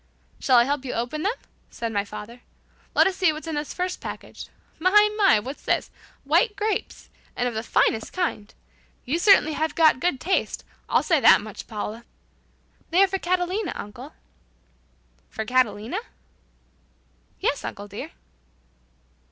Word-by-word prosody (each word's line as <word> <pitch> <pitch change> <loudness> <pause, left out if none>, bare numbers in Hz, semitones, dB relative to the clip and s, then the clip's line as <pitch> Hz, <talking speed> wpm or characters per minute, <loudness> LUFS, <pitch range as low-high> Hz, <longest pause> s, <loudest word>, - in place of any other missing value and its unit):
"Shall 255 -2 +4
I 235 - +7
help 280 +1 -1
you 260 - -4
open 245 +6 -3
them?" 410 +8 0 0.3
said 230 -1 -4
my 200 -1 +1
father. 210 +4 -9 0.5
"Let - - +6
us 380 - +1
see 370 -4 +4
what's 310 +1 -7
in 325 - -4
this 295 0 -3
first 360 0 -3
package. - - -8 0.3
My, 365 +3 +3 0.3
my, 390 - +5
what's 260 +7 -7
this? - - -1 0.3
White 445 -4 +2
grapes! 425 0 -3 0.2
And 245 - 0
of 245 - -3
the 220 - -2
finest 225 -1 +1
kind! 280 - -2 0.5
You 290 +6 0
certainly 345 -5 +5
have 315 0 -2
got 315 -5 +5
good 300 -3 0
taste. 375 +7 -1 0.3
I'll - - +3
say - - +3
that - - +7
much, - - -9
Paula!" 220 +1 -5 0.9
"They 360 +4 +5
are - - +4
for 385 0 -2
Catalina, 365 +2 -1
uncle." 205 - -9 1.2
"For 220 - -5
Catalina?" 240 - 0 1.4
"Yes, 335 -7 -1
uncle 205 -1 -6
dear." 215 +10 -7
295 Hz, 150 wpm, -24 LUFS, 230-360 Hz, 1.4 s, I